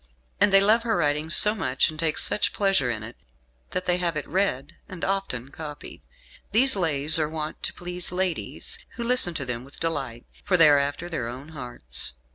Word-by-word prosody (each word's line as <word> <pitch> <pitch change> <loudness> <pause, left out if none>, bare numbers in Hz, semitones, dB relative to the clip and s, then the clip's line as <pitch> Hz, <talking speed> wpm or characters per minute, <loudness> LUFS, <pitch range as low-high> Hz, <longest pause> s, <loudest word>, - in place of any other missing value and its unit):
And 205 0 +4
they 195 - +7
love 215 +4 +4
her 230 -3 0
writing 150 -1 0
so 210 +5 +6
much, 135 -9 0
and 155 - -12
take 160 -2 +1
such 210 - +1
pleasure 195 -11 +1
in 110 -2 -3
it, 115 +2 -9 0.5
that 185 0 -3
they 180 0 +2
have 170 -3 -1
it 150 - -5
read, 180 -8 -1 0.2
and 180 -2 -5
often 190 -11 -2
copied. 150 -1 -9 0.5
These 255 +5 +6
Lays 160 -4 +1
are 155 -1 0
wont 155 -1 -5
to - - -2
please 180 0 -3
ladies, 180 -1 -3 0.2
who 235 - -4
listen 235 -8 +3
to 140 - -3
them 120 -1 -3
with 140 +2 -13
delight, 135 -8 -3 0.2
for 185 -3 +2
they 165 -3 +7
are 145 -1 +5
after 145 +5 -2
their 160 -9 -4
own 130 +5 -8
hearts." 120 - -5
160 Hz, 200 wpm, -25 LUFS, 140-190 Hz, 0.5 s, they